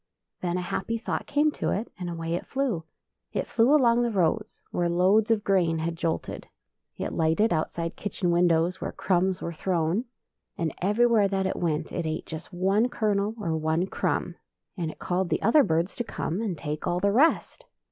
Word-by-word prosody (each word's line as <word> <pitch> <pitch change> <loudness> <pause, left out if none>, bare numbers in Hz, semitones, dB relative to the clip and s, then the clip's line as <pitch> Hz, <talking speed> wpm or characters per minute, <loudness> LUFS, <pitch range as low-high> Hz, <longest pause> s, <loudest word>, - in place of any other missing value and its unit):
Then 175 0 -1
a - - -1
happy 190 +5 -2
thought 230 - -3
came 295 +1 +2
to - - -2
it, 215 +4 -2
and 180 -1 -4
away 165 -1 -3
it 175 - -3
flew. 255 -12 -1 0.5
It - - -1
flew 235 +3 +3
along 240 -4 +4
the 240 - +1
roads 185 -7 0
where 175 -1 0
loads 190 +6 +3
of 220 -2 +2
grain 175 -4 +2
had 165 +1 -2
jolted; 165 0 -3 0.5
it - - -3
lighted 165 +7 +2
outside 165 +1 -2
kitchen 190 -3 -2
windows 170 +1 +2
where - - -3
crumbs 185 0 0
were 170 - -3
thrown; 175 +5 0 0.5
and 165 -2 -1
everywhere 210 +2 +4
that 195 -1 -1
it - - -1
went 160 -3 -1
it 170 -3 -2
ate 155 +1 -3
just 160 +1 -8
one 195 +6 +2
kernel 210 -2 0
or 165 -6 -1
one 160 +2 +1
crumb, - - -1 0.4
and 170 -5 -2
it - - -9
called 180 0 -1
the - - -1
other 235 +8 +6
birds 165 -1 0
to 240 - -1
come 185 -3 -3
and 200 -7 -2
take 150 0 -4
all 175 - +1
the 200 +2 +2
rest. 285 +10 +2
180 Hz, 190 wpm, -27 LUFS, 165-215 Hz, 0.5 s, other